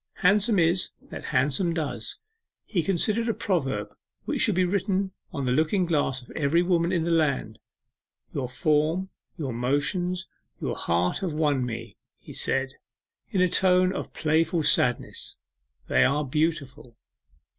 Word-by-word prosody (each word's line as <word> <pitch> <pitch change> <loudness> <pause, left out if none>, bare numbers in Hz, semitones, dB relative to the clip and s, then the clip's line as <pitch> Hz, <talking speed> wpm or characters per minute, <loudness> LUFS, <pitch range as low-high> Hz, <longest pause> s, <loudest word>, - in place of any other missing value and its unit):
'Handsome 205 +3 +4
is 175 +1 +2 0.2
that - - -7
handsome 145 +6 +1
does' 155 -4 -3 0.5
he 180 - 0
considered 210 +7 +1
a 225 - 0
proverb 135 - -1 0.3
which - - -1
should - - +2
be 185 0 +3
written 195 +1 0 0.2
on 140 -6 -3
the 125 - +1
looking 160 +7 +2
glass 145 -6 0
of - - -15
every 155 +4 +2
woman 175 -1 +2
in 170 -3 +1
the 170 - 0
land. 140 -9 +1 0.7
'Your 130 -3 -2
form, 155 +7 +1 0.3
your 140 -7 -3
motions, 145 +9 0 0.3
your - - -2
heart 85 +1 0
have 180 -5 -2
won 150 -4 +1
me,' 120 -1 -6 0.2
he - - -12
said, 135 0 -1 0.6
in 190 - +1
a 185 - +5
tone 185 +1 +3
of - - -5
playful 160 +1 +1
sadness. 125 -4 +1 0.5
'They - - +4
are 145 +3 +2
beautiful. 140 -4 -2
160 Hz, 145 wpm, -26 LUFS, 135-185 Hz, 0.7 s, a